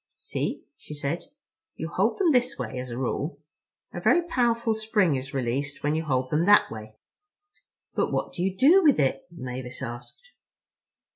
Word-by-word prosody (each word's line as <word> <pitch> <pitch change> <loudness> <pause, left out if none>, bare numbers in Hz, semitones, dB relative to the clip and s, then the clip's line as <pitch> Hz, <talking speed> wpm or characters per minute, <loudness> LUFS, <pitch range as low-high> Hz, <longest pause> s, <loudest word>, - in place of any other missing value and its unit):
"See," - - -4
she 150 - -10
said, 145 +3 -3 0.5
"you - - -4
hold - - 0
them 370 -5 +3
this 250 -1 +2
way 130 - -4
as 125 0 -6
a 120 - -5
rule. 135 +5 -2 0.6
A - - -5
very 345 - +4
powerful 235 -8 +1
spring 215 -6 +1
is 135 0 -3
released 135 +2 -2
when 145 +1 +1
you 160 +1 -1
hold 130 -3 0
them 160 +4 +2
that 205 - +6
way." 110 -1 -9 1.0
"But - - 0
what - - -2
do - - -4
you 190 +1 -1
do 330 - +6
with 295 - +4
it?" 135 +3 0
Mavis 130 -5 -7
asked. 120 - -9
150 Hz, 170 wpm, -26 LUFS, -, 1.0 s, that